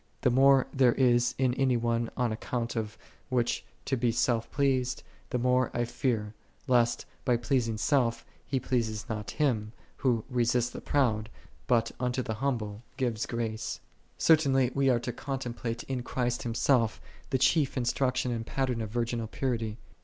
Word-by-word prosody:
The 125 - +3
more 135 +1 +5
there 130 -3 +4
is 120 -2 +3
in 130 -2 +2
any 130 -1 +2
one 115 0 0
on 125 -2 +1
account 120 +2 -3
of 110 -2 -3 0.3
which 120 -2 0 0.2
to 135 - 0
be 120 -1 +1
self 115 0 +1
pleased, 130 -3 +1 0.3
the 125 - 0
more 125 +1 +2
I 120 - +1
fear, 115 -3 -1 0.3
lest, 120 -3 +2 0.2
by 125 -2 +2
pleasing 120 -2 0
self, 120 -1 +1 0.2
he 135 0 -1
please 115 -5 -1
not 105 -3 -4
Him, 110 -6 0 0.2
Who 120 -5 +1
" - - -30
resisteth 120 0 +1
the - - -7
proud, 110 -6 +1 0.4
but 115 -1 +2
unto 125 +1 0
the 110 - -3
humble 110 -6 -2 0.2
giveth 120 -4 -1
grace."5 115 -2 -3
35. - - -29 0.4
Certainly 135 -5 +4
we 140 -1 +2
are 120 -2 +3
to 120 0 -4
contemplate 120 -3 -4
in 130 -2 -3
Christ 120 -1 -1
Himself, 115 0 +1 0.3
the 130 - +2
chief 135 +2 +2
instruction 125 0 0
and 115 -1 -2
pattern 125 -1 -1
of 110 - -4
virginal 115 0 -2
purity. 115 -3 -2
120 Hz, 165 wpm, -29 LUFS, 115-130 Hz, 0.4 s, more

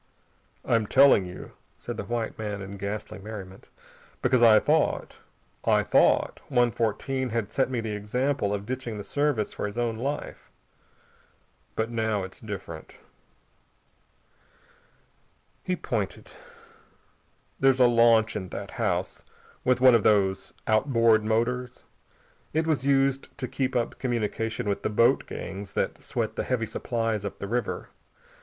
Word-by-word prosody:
"I'm 115 -3 +2
telling 135 -7 +6
you," 90 - -9 0.3
said - - -6
the - - -4
white 120 -1 -3
man 105 -2 -3
in 95 - -8
ghastly 100 +1 -5
merriment, 95 -2 -9 0.5
"because 130 -2 +3
I 110 -2 +8
thought - - 0 0.4
I - - +3
thought - - +3
One 120 -3 +3
Fourteen 125 +4 -1
had 110 -2 -2
set 130 - +1
me 125 -3 -1
the 110 -2 -4
example 110 +2 -1
of 100 -1 -3
ditching 125 -2 -4
the 105 - -5
Service 145 -4 0
for - - -3
his 105 - -8
own 120 -2 0
life. 140 +5 -5 1.3
But 110 +1 -1
now 110 -3 0
it's 95 0 -8
different." 95 -7 -8 2.6
He 185 - -1
pointed. - - -4 1.3
"There's 135 -1 +4
a 125 - +7
launch 115 -1 +4
in 95 - -4
that - - -6
house, - - -1 0.4
with 125 -1 +2
one 130 -1 +8
of 115 - +5
these 95 -3 +2
outboard 115 -1 +3
motors. 120 +3 -1 0.7
It 160 +1 +1
was 145 -4 0
used 135 -1 +1
to 130 -2 -3
keep 130 0 -2
up 120 -1 -1
communication 115 -2 -2
with 100 - -1
the - - -1
boat 115 +2 +3
gangs 95 0 -7
that - - -2
sweat - - -3
the - - 0
heavy 125 -3 -1
supplies 115 -3 -2
up 100 - -5
the 100 - -5
river. 120 0 -2
115 Hz, 140 wpm, -27 LUFS, 105-125 Hz, 2.6 s, I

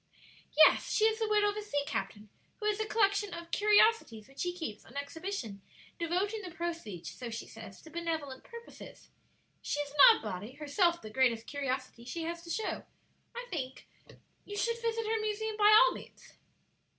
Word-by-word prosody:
"Yes; 315 - +6
she 435 - +3
is 445 0 +2
the 445 - 0
widow 420 -1 +4
of - - -9
a - - -2
sea 290 -9 -2
captain, 210 -6 -4 0.3
who 425 - -5
has 425 0 +1
a 435 - -1
collection 405 -3 +1
of 340 0 -9
curiosities 415 - +3
which 270 - -17
she 355 - 0
keeps 320 -13 -6
on 245 - -12
exhibition, 285 - -5 0.4
devoting 375 +6 -1
the 370 - -7
proceeds, 330 - -5
so 245 -2 -7
she 230 0 -6
says, 220 -4 -11
to 320 - -13
benevolent 320 -5 -4
purposes. 470 0 -12 0.5
She 290 - -2
is 290 -1 -3
an 295 - -12 0.2
odd - - -5
body; 210 +3 -5
herself 335 +4 +1
the 215 - -8
greatest 230 -2 +2
curiosity 260 -4 -4
she 330 +7 -5
has 335 +1 -4
to 340 - -13
show, 440 +5 -2 0.5
I 485 +1 -5
think. 265 -6 -5 0.6
You 410 - -7
should 465 +2 -1
visit 455 -1 -1
her 440 0 0
museum 430 0 -2
by 420 0 +5
all - - +8
means." - - -13
340 Hz, 185 wpm, -31 LUFS, 260-425 Hz, 0.6 s, all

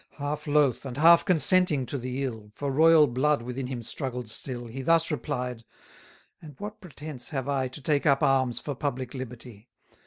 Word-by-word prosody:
Half 145 +1 -4
loath, 145 -4 +2
and 135 -2 -6
half 170 +2 +6
consenting 165 -3 +3
to 140 - -5
the 130 +2 -3
ill, 110 -5 -5
For 140 -1 -3
royal 160 +2 +6
blood 140 +1 +1
within 125 +2 -4
him 125 -2 -5
struggled 125 -1 -3
still, 120 0 -5
He 120 +3 -7
thus 165 +4 +3
replied: 125 -6 -3 0.8
And 150 -4 -12
what 210 +1 -8
pretence 150 -7 -7
have 135 -3 -3
I 135 -2 0
To 130 +4 -9
take 145 +1 +1
up 140 -1 +3
arms 130 -3 +2
for 145 - -4
public 130 -2 -4
liberty? 125 -3 -9
135 Hz, 180 wpm, -27 LUFS, 125-150 Hz, 0.8 s, half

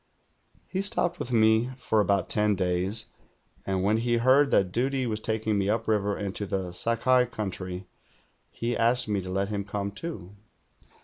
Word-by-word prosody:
He 190 - -3
stopj)ed 180 -3 0
with 125 - -4
me 110 +1 +4
for 110 -4 0
about 100 -3 +2
ten 105 -1 +2
days, 95 +4 0 0.6
and 95 -1 0
when 105 +3 +3
he 120 +1 +1
heard 130 +4 +4
that 95 -7 +2
duty 130 +4 0
was 110 -2 -2
taking 110 -1 -1
me 100 0 0
upriver 105 -2 0
into 100 0 -4
the 95 -2 -3
Sakai 120 +6 +2
country, 95 -4 -5 0.6
he 120 +1 -3
asked 115 +1 +2
me 105 -2 0
to 95 - -7
let 95 +2 -1
him 100 -2 -2
come, 100 0 -4
too. 100 - -6
105 Hz, 165 wpm, -27 LUFS, 100-120 Hz, 0.6 s, me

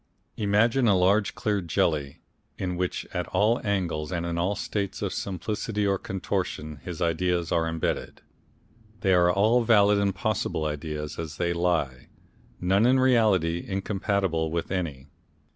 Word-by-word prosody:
Imagine 115 +5 +2
a 100 -3 +5
large 100 +3 +2
clear 105 -2 0
jelly, 75 -4 -1 0.4
in 90 -1 -2
which 90 0 -2
at 90 -1 -2
all 105 +6 +2
angles 85 -7 -1
and 85 -2 -2
in 85 0 -2
all 90 +4 0
states 100 0 -3
of 100 - -2
simplicity 105 +2 -3
or 100 -1 +1
contortion 80 -4 -3
his 85 +4 -5
ideas 85 0 0
are 80 -1 +2
imbedded. 80 -1 -3 0.8
They 95 -1 +3
are 90 -1 +5
all 110 +6 +3
valid 105 -3 +5
and 100 -1 0
possible 95 -6 -1
ideas 75 0 -4
as 80 -2 -5
they 85 -1 0
lie, 80 -8 -1 0.5
none 95 +6 +3
in 130 +1 +4
reality 105 -10 +3
incompatible 95 -4 -1
with 85 +2 -3
any. 80 -8 -3
90 Hz, 145 wpm, -26 LUFS, 85-100 Hz, 0.8 s, a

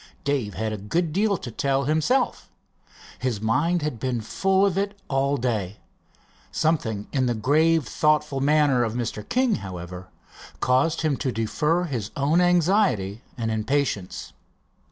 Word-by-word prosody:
Dave 130 -9 -1
had 110 +2 -2
a 105 - -5
good 160 - -1
deal 200 +1 +2
to 120 - -7
tell 135 +3 0
himself. 160 - 0 0.7
His 125 -5 -1
mind 150 - +1
had 150 -7 -3
been 125 -1 -1
full 190 - +1
of 195 -3 +1
it 200 +1 -2
all 140 +1 +1
day. 105 -6 -2 0.7
Something 120 -11 0
in 130 -3 +1
the 120 - 0
grave, 155 +6 +3
thoughtful 150 -1 +1
manner 145 -3 +3
of 115 -1 -2
Mr. 115 -3 -4
King, 255 -2 +2
however, 90 -2 -8 0.5
caused 130 +6 +2
him 155 -4 +1
to 130 0 -1
defer 150 +10 0
his 120 - -3
own 150 +5 +3
anxiety 175 - +2 0.2
and 115 -2 -2
impatience. 110 -3 -2
135 Hz, 145 wpm, -24 LUFS, 110-165 Hz, 0.7 s, grave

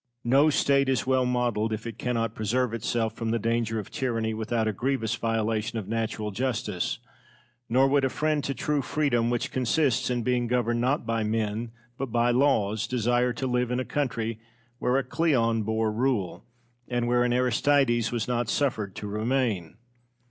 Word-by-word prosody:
Cosmo. 120 - -4 0.2
No - - +5
State 140 -2 +3
is 130 - +1
well 130 -1 +2
modelled 120 -3 0
if 110 +1 -4
it 115 -1 -7
cannot 115 -3 -1
preserve 115 +3 0
itself 115 -1 -1
from 115 0 -4
the 115 - +1
danger 115 0 0
of 105 - -5
tyranny 115 -4 -1
without 110 +1 -1
a 110 - 0
grievous 120 0 -1
violation 115 -1 -1
of 105 -4 -4
natural 110 -1 -2
justice; 105 -4 -2 0.7
nor 130 +3 +4
would 140 0 +2
a 135 - +2
friend 150 +1 0
to 140 - -2
true 145 +4 0
freedom, 125 -5 +1
which 120 +2 -1
consists 130 +1 +1
in 120 -1 -1
being 125 0 +1
governed 120 -1 +1
not 130 +4 +1
by 115 -1 0
men 110 +1 -1 0.3
but 135 - -1
by 120 +1 +3
laws, 110 -5 +2
desire 125 0 +1
to 120 +2 -4
live 125 -1 0
in 125 +1 0
a 130 - -2
country 115 -6 -2 0.4
where 125 +2 +2
a 135 - +1
Cleon 125 -5 +1
bore 110 +1 0
rule, 110 -5 -1 0.4
and 120 -1 -1
where 120 0 +3
an 125 - +1
Aristides 125 -1 +2
was 120 -3 -2
not 120 -2 -1
suffered 110 -9 -1
to - - -6
remain. 105 -4 -1
120 Hz, 180 wpm, -27 LUFS, 110-130 Hz, 0.7 s, No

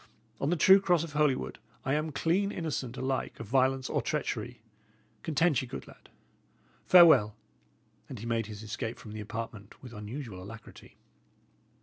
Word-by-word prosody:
On 140 - 0
the 175 - +2
true 190 +4 +7
cross 175 -4 +2
of 165 -3 -7
Holywood, 145 - 0 0.3
I 135 - +1
am 155 +1 -1
clean 180 +8 +1
innocent 140 - -4
alike 130 0 -2
of 115 - -6
violence 130 +3 +2
or - - 0
treachery. 120 -5 -3 0.6
Content 160 -1 +2
ye, 130 - -6
good - - -8
lad. - - -17 0.8
Farewell!" 160 - +7 0.7
And 130 - -7
he 110 - -8
made 115 -2 -1
his 105 -1 -8
escape 110 +2 -4
from 110 - -11
the 110 0 -6
apartment 110 0 -7
with 125 -2 -10
unusual 105 -1 -7
alacrity. 115 +3 -12
130 Hz, 155 wpm, -30 LUFS, 110-150 Hz, 0.8 s, true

